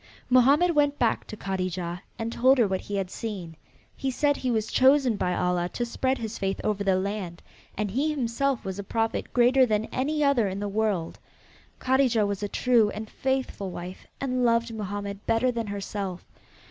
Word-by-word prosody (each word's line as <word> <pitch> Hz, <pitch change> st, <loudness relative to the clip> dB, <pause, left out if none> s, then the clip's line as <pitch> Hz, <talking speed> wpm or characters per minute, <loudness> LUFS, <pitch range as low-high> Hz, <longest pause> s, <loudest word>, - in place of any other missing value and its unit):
Mohammed 280 Hz, +8 st, +5 dB
went 290 Hz, -1 st, +2 dB
back 235 Hz, -2 st, 0 dB
to 215 Hz, -, -8 dB
Kadijah 185 Hz, -3 st, -3 dB, 0.2 s
and 230 Hz, +1 st, -3 dB
told 260 Hz, +3 st, +4 dB
her 235 Hz, -4 st, +4 dB
what 190 Hz, -1 st, -2 dB
he 205 Hz, -, -5 dB
had 190 Hz, -2 st, -2 dB
seen. 190 Hz, -8 st, -6 dB, 0.4 s
He 270 Hz, -, -2 dB
said 285 Hz, +2 st, +1 dB
he 255 Hz, -, -2 dB
was 220 Hz, -2 st, -1 dB
chosen 265 Hz, -2 st, +4 dB
by 180 Hz, -2 st, -1 dB
Allah 180 Hz, -1 st, 0 dB
to 240 Hz, -, -1 dB
spread 260 Hz, +3 st, -1 dB
his 225 Hz, -1 st, -5 dB
faith 195 Hz, 0 st, -1 dB
over 205 Hz, -1 st, 0 dB
the 195 Hz, -1 st, +3 dB
land, 185 Hz, -2 st, -3 dB, 0.3 s
and 210 Hz, -1 st, -1 dB
he 275 Hz, +8 st, +1 dB
himself 270 Hz, -2 st, -1 dB
was 190 Hz, 0 st, -4 dB
a -, -, -3 dB
prophet 225 Hz, +3 st, -2 dB
greater 250 Hz, +2 st, +5 dB
than 215 Hz, -3 st, +1 dB
any 300 Hz, +4 st, 0 dB
other 275 Hz, -7 st, +3 dB
in 190 Hz, +1 st, -4 dB
the 205 Hz, -, -2 dB
world. 200 Hz, -5 st, -1 dB, 0.6 s
Kadijah 255 Hz, -4 st, +2 dB
was 200 Hz, -1 st, -3 dB
a 205 Hz, -, -1 dB
true 235 Hz, -3 st, +3 dB
and 215 Hz, +1 st, -7 dB
faithful 265 Hz, -7 st, -2 dB
wife 180 Hz, +1 st, -8 dB
and 255 Hz, -2 st, -1 dB
loved 230 Hz, -1 st, +2 dB
Mohammed 205 Hz, -1 st, -5 dB
better 230 Hz, +3 st, +2 dB
than 230 Hz, -2 st, -3 dB
herself. 200 Hz, -2 st, -5 dB
220 Hz, 185 wpm, -26 LUFS, 195-255 Hz, 0.6 s, Mohammed